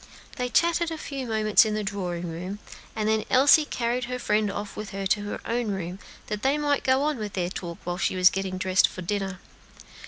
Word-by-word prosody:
They 250 0 -1
chatted 340 +3 +2
a 325 - -4
few 275 -4 -5
moments 215 -2 +4
in 215 -1 -1
the 215 - -1
drawing 180 -4 -3
room, 180 +4 -5 0.4
and 215 -1 -1
then 220 0 +2
Elsie 285 +4 +6
carried 240 -1 -1
her 250 +1 -4
friend 210 -3 +1
off 205 0 -6
with 210 -1 -6
her 195 0 -4
to 205 +2 +2
her 205 - -4
own 235 0 -1
room, 190 -1 -4 0.3
that 210 -1 -4
they 275 +4 +2
might 290 -1 +1
go 260 +1 +3
on 300 -2 0
with 210 -2 -5
their 180 -2 -1
talk 170 -3 -6
while 175 +1 -3
she - - 0
was 185 0 +6
getting 190 -1 -3
dressed 185 0 +3
for 185 - -8
dinner. 195 0 -2
210 Hz, 220 wpm, -26 LUFS, 190-250 Hz, 0.4 s, Elsie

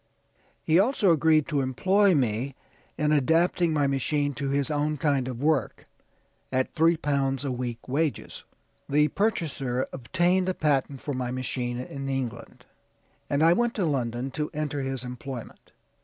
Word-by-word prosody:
He 160 +3 +4
also 205 -3 +3
agreed 155 -1 +3
to 145 -3 +1
employ 185 +9 +3
me 130 0 0 0.4
in 150 0 +1
adapting 165 +4 +2
my 150 -2 +2
machine 145 +1 0
to 140 0 -3
his 140 +2 0
own 150 +1 0
kind 140 -4 +1
of 125 +1 -5
work 155 -2 0 0.7
at 130 0 0
three 165 +1 +3
pounds 140 -3 -1
a 135 - -1
week 120 -2 -5
wages." 145 +3 -2 0.5
"The 150 +2 +3
purchaser 145 - -1
obtained 180 +7 +1
a 185 - -1
patent 140 -3 0
for 145 - -4
my 125 -1 -2
machine 125 -1 -3
in 135 +2 -5
England, 130 -4 -5 0.6
and 145 +2 +2
I 165 +1 +6
went 240 +4 0
to 195 - 0
London 125 -3 -2
to 150 +1 -3
enter 150 -2 -2
his 135 -1 -3
employment. 125 0 -8
140 Hz, 155 wpm, -26 LUFS, 130-160 Hz, 0.7 s, I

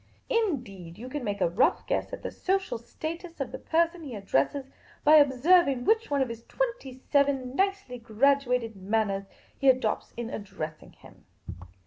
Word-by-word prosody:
Indeed, 240 - -2
you 250 +3 -8
can 290 0 -4
make 205 -3 -3
a - - +4
rough 205 +9 +2
guess - - -1
at - - -7
the - - -4
social 380 -10 -1
status 330 +8 -7
of 275 - -3
the - - -6
person 335 +1 +1
he 275 -7 -7
addresses 200 - 0 0.4
by 305 +1 +8
observing 280 0 +4
which 445 +1 +2
one 280 -2 +2
of 255 - -5
his 230 0 -7
twenty - - -3 0.2
seven 275 -3 +2
nicely 390 -10 -1
graduated 250 0 +1
manners 195 0 -1 0.3
he 275 - +3
adopts 255 -4 +1
in 235 -1 -4
addressing 160 -7 -7
him. - - -18
265 Hz, 160 wpm, -28 LUFS, 225-320 Hz, 0.4 s, by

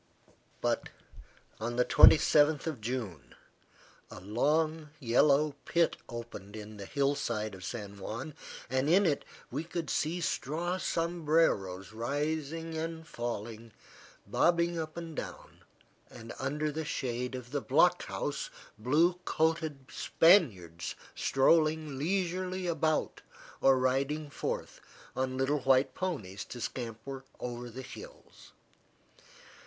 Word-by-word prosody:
But, - - 0 0.7
on 120 +2 -3
the 125 0 +3
27th 150 -1 +6
of 155 -8 -3
June, 110 - -4 0.7
a - - -9
long, 150 - 0
yellow 140 +4 +4
pit 170 -1 +2
opened 115 -4 -8
in 105 0 -8
the 100 - -7
hill 140 -1 +1
side 110 -6 -2
of 95 -1 -10
San 100 -2 -6
Juan, 115 +10 -5 0.3
and 130 +3 0
in 195 +4 +5
it 150 -5 +1 0.3
we 140 +6 -2
could 165 -2 -4
see 165 +4 0
straw 170 +3 -1
sombreros 155 - +1
rising 150 +7 -2
and 160 0 -4 1.2
bobbing 170 0 +2
up 160 0 -5
and 165 -2 -6
down, - - -7 0.5
and 115 - -9
under 150 +3 -1
the 160 +2 -3
shade 125 -3 -3
of 125 -1 -8
the 145 -1 -1
block - - +4
house, - - -3 0.3
blue 160 +10 +3
coated 160 -5 0
Spaniards 100 - +3 0.2
strolling 155 0 +2
leisurely 185 +2 -1
about 160 -2 0 0.4
or 135 -1 +6
riding 135 +4 0
forth - - -4 0.3
on 130 0 -1
little 135 +3 +1
white 135 0 +3
ponies 110 - -3
to 125 - -8
scamper 120 +3 -5 0.2
over 120 0 -5
the 130 +3 -8
hills. 125 - -12
140 Hz, 115 wpm, -31 LUFS, 120-160 Hz, 1.2 s, 27th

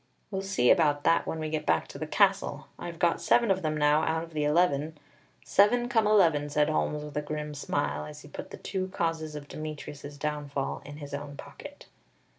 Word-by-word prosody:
"We'll 195 -1 -2
see 195 -11 +3
about 150 -5 +3
that 165 - +3
when 160 - -2
we 155 0 -3
get 155 -1 -1
back 80 -1 +2
to - - -9
the - - -3
castle, - - +2
I've 170 -1 -6
got 170 0 +2
seven 235 -3 +4
of 190 0 +1
them 155 -2 -1
now 150 +1 +4
out 160 0 0
of 165 -1 -11
the 150 -1 0
eleven. 150 -1 +2 0.5
Seven, 210 - +4
come 225 -4 +3
eleven!" 165 -9 +4
said 150 +1 +2
Holmes 150 -1 0
with 150 -1 -9
a - - +1
grim 150 0 -4
smile, 75 - -2
as 75 - -10
he - - -12
put - - -8
the - - -8
two 185 -1 -3
causes 165 -4 -2
of 145 -1 -7
Demetrius's 150 -2 -7
downfall 145 -2 -3
in 145 +1 -9
his 145 -2 -9
own 140 0 -6
pocket. 290 0 -11
155 Hz, 210 wpm, -29 LUFS, 145-170 Hz, 0.5 s, seven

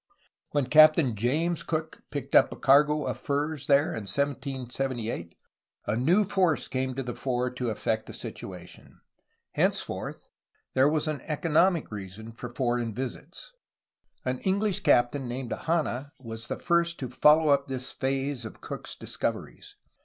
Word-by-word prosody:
When 145 -2 +1
Captain 155 -2 +6
James 155 +10 0
Cook 160 0 -3
picked 140 -2 -5
up - - +6
a - - -5
cargo 150 +2 +4
of - - -3
furs 145 0 -2
there 140 +1 +4
in 110 -2 -4
1778 130 - -3 0.5
a 105 - 0
new 170 - +3
force 190 -5 +1
came 130 -1 -2
to 135 - -2
the 120 -1 -4
fore 125 -1 -1
to 125 -1 -3
affect 110 0 -1
the - - -8
situation; 90 -2 -9 0.5
henceforth - - -1 0.5
there 135 +2 +5
was 155 +1 0
an 155 -2 -2
economic 165 +1 +2
reason 105 +2 -7
for 120 +1 -8
foreign 120 -2 -1
visits. 130 - -7 0.7
An 130 0 -1
English 195 0 +1
captain 120 +2 +3
named 120 0 -4
Hanna 150 -3 -1
was 115 -2 -7
the - - -3
first 170 -1 +1
to 130 - -4
follow 150 +5 +5
up 140 0 +3
this 130 -1 -4
phase 135 -1 -2
of 110 - -9
Cook's - - -6
discoveries. - - -5
135 Hz, 145 wpm, -28 LUFS, 120-155 Hz, 0.7 s, Captain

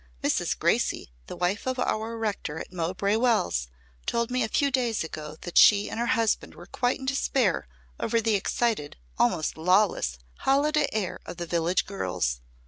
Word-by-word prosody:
Mrs. - - +1
Gracey, - - 0 0.2
the - - -6
wife 185 +7 -1
of 260 0 -1
our 230 -2 -1
rector 205 -8 -3
at - - -8
Mowbray 185 +4 0
Wells 225 - +1 0.4
told 235 +1 0
me 255 0 +1
a 225 - +1
few 280 +4 +2
days 245 -6 +1
ago 155 -1 -7
that 175 - +2
she 205 -1 +6
and - - -4
her 240 - 0
husband 225 -2 0
were 175 - -11
quite 245 +6 0
in 265 - -7
despair 265 - +1 0.3
over 230 +1 +1
the 225 -1 +1
excited, 205 -5 0 0.2
almost 155 +6 +1
lawless, 180 - +2 0.2
holiday 290 +2 +2
air 210 -5 -2
of - - -7
the 175 - -4
village 170 +2 +1
girls. 90 - -2
205 Hz, 170 wpm, -27 LUFS, 170-240 Hz, 0.4 s, she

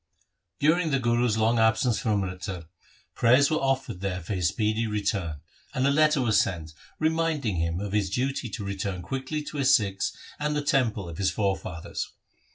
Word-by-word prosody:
During 160 +3 +3
the 140 - +2
Guru's 120 -2 +1
long 115 +1 +2
absence 110 +1 +3
from 110 - 0
Amritsar, 90 -1 -5 0.5
prayers 130 +5 +4
were 155 - +2
offered 135 -8 -1
there 95 -2 -2
for 85 +4 -5
his 90 -3 +1
speedy 110 +3 0
return, 100 -8 -2 0.3
and 130 - +1
a 140 - +4
letter 150 -1 +4
was 110 -4 +4
sent 80 -4 -4 0.2
reminding 160 - 0
him 85 +1 -1
of 100 0 -4
his 100 -2 +1
duty 130 +4 -1
to 105 0 -5
return 100 -2 -3
quickly 135 - -3
to 150 - -7
his 135 -2 +5
Sikhs 100 -3 0 0.3
and 150 0 -1
the 150 - -1
temple 115 -9 +1
of 85 -2 -8
his 95 - +2
forefathers. 95 -5 -3
110 Hz, 175 wpm, -27 LUFS, 95-135 Hz, 0.5 s, his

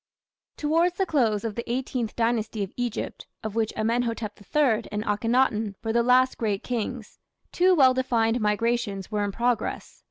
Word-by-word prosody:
Towards 330 +4 +1
the 385 - +2
close 230 - +1
of 225 -2 -3
the 235 +2 -5
Eighteenth 250 -2 -2
Dynasty 225 -2 0
of 195 - -7
Egypt, 245 -3 -4 0.2
of 215 -2 -4
which 225 -1 0
Amenhotep 230 -1 -1
III 240 -1 +1
and 210 0 -2
Akhenaton 220 -1 +1
were 225 -1 -1
the 235 - +4
last 255 +2 +3
great 210 -3 -1
kings, 240 -1 -4 0.3
two 365 +1 +4
well 265 -5 +6
defined 240 -2 +1
migrations 210 -2 -1
were 210 -1 0
in 205 - -1
progress. 240 +3 -2
230 Hz, 160 wpm, -26 LUFS, 215-250 Hz, 0.3 s, well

